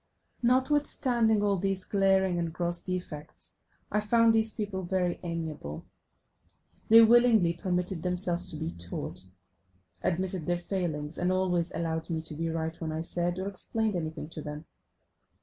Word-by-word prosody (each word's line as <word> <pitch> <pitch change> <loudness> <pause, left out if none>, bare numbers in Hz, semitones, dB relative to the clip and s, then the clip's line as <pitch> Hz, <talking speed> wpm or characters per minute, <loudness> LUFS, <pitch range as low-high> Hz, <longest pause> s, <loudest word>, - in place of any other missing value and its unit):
Notwithstanding 250 -4 +2
all 200 -1 +2
these 195 0 0
glaring 190 -2 +2
and 170 -1 -2
gross 175 0 +1
defects 175 -4 -6 0.3
I 210 - +2
found 230 +2 +4
these 220 0 +3
people 205 -3 -4
very 180 -1 0
amiable: 160 - -5 1.0
they 225 +1 +9
willingly 225 -6 +5
permitted 180 0 -2
themselves 180 -1 -1
to - - -7
be 160 +2 -3
taught, 90 +1 -6 0.7
admitted 185 -1 -1
their 175 0 +2
failings, 170 -4 -3
and 180 +1 +1
always 180 -2 +1
allowed 160 0 -2
me 165 -1 -1
to 160 - -3
be 165 +2 -2
right 160 0 -2
when 160 -1 -2
I 160 +1 -2
said 175 +1 -1
or 190 +1 -3
explained 215 +2 -1
anything 160 -2 -4
to 165 -2 -6
them. 150 +1 -7
180 Hz, 150 wpm, -29 LUFS, 165-200 Hz, 1.0 s, they